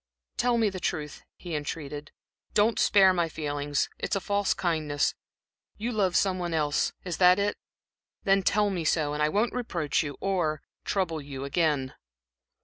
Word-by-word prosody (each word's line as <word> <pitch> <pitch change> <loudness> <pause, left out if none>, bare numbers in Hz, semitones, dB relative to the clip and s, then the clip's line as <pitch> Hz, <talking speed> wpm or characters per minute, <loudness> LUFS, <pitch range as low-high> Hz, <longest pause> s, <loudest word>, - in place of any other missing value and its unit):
"Tell 245 -1 +2
me 220 -3 +2
the 185 - -6
truth," 150 -4 -3 0.2
he 175 -2 -7
entreated, 145 -1 -5 0.4
"don't 215 +2 +3
spare 190 -2 +6
my 170 -2 0
feelings. 145 -2 -1
It's - - -1
a - - +1
false 200 +1 0
kindness. 155 -4 0 0.6
You 230 +4 -2
love 195 -5 +1
someone 185 -3 +1
else 150 -2 +1
is 180 -3 -4
that 180 0 +6
it? 205 0 0 0.7
then 195 0 +4
tell 205 +2 +2
me 180 -3 -2
so, 150 -1 +1
and 150 - -2
I 150 - +3
won't 215 +8 +1
reproach 170 - -1
you 145 -3 -5
or 170 -6 -1 0.2
trouble 170 -6 -1
you 140 -1 -6
again." 145 -3 0
170 Hz, 160 wpm, -28 LUFS, 150-195 Hz, 0.7 s, spare